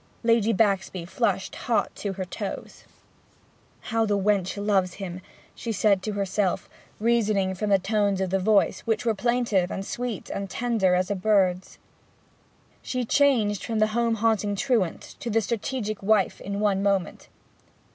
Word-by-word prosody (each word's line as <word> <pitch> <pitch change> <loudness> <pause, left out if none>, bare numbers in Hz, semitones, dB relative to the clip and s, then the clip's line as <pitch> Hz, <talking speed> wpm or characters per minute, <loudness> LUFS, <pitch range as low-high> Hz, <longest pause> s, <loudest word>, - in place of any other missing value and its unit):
Lady 230 -1 +3
Baxby 195 -4 +1
flushed 175 - -1
hot - - -1
to 200 -2 -4
her 190 -1 -4
toes. 195 +2 -7 1.0
'How 225 0 0
the 205 -2 +1
wench 200 -1 +1
loves 195 -3 +1
him!' 185 -2 -6 0.3
she 230 - -5
said 200 -2 +2
to 210 +2 -3
herself, 200 -1 -1 0.3
reasoning 215 -4 +2
from 205 +3 -3
the 200 - +5
tones 200 0 0
of 190 -2 -1
the 195 - +2
voice, 200 -1 +3
which 225 0 -2
were 225 - +3
plaintive 230 -5 +1
and 195 - -4
sweet 240 -3 -4
and 195 0 -4
tender 225 -7 +1
as 185 +2 0
a - - +1
bird's. 190 -2 +1 1.0
She 255 -1 -3
changed 225 -7 +2
from 225 -2 -2
the 215 0 +4
home 235 0 +1
hating 215 -2 +1
truant 200 -5 0 0.2
to 235 - -4
the 225 0 +3
strategic 225 0 -3
wife 200 -1 +2
in 200 +1 -4
one 200 -2 +1
moment. 195 -3 -1
205 Hz, 155 wpm, -25 LUFS, 190-225 Hz, 1.0 s, the